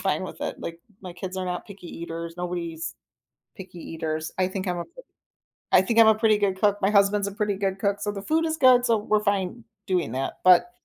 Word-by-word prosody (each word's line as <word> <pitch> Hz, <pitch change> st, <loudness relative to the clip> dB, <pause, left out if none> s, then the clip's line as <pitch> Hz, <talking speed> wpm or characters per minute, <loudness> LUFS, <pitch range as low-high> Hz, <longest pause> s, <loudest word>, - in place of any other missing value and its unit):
fine -, -, 0 dB
with -, -, -8 dB
it, -, -, -4 dB
like, 165 Hz, 0 st, -6 dB, 0.2 s
my 185 Hz, -2 st, -8 dB
kids 185 Hz, +1 st, -6 dB
are 185 Hz, -, -2 dB
not 180 Hz, -1 st, -4 dB
picky 200 Hz, -3 st, -11 dB
eaters, 165 Hz, 0 st, -6 dB
nobody's 175 Hz, -2 st, -4 dB, 0.6 s
picky 185 Hz, -2 st, -10 dB
eaters, 160 Hz, -1 st, -4 dB
I 185 Hz, 0 st, +2 dB
think 190 Hz, 0 st, -4 dB
I'm 180 Hz, -1 st, -1 dB
a -, -, -3 dB
p -, -, -26 dB, 0.8 s
I 185 Hz, -, +7 dB
think 230 Hz, +4 st, 0 dB
I'm 225 Hz, -, +8 dB
a 220 Hz, -, +6 dB
pretty 215 Hz, -1 st, +3 dB
good 195 Hz, -2 st, 0 dB
cook, 205 Hz, -1 st, +3 dB
my 195 Hz, -, +3 dB
husband's 200 Hz, 0 st, +3 dB
a -, -, -7 dB
pretty 210 Hz, 0 st, -1 dB
good 195 Hz, -1 st, -2 dB
cook, 200 Hz, 0 st, 0 dB
so 205 Hz, -, -1 dB
the 195 Hz, -, -6 dB
food 315 Hz, +9 st, +1 dB
is 320 Hz, 0 st, -1 dB
good, 255 Hz, -3 st, +6 dB
so, 230 Hz, -2 st, +3 dB
we're 210 Hz, 0 st, +1 dB
fine 200 Hz, +2 st, -1 dB, 0.2 s
doing 180 Hz, -11 st, 0 dB
that, 130 Hz, +1 st, -3 dB
but 185 Hz, +6 st, +6 dB
195 Hz, 230 wpm, -25 LUFS, 180-210 Hz, 0.8 s, I'm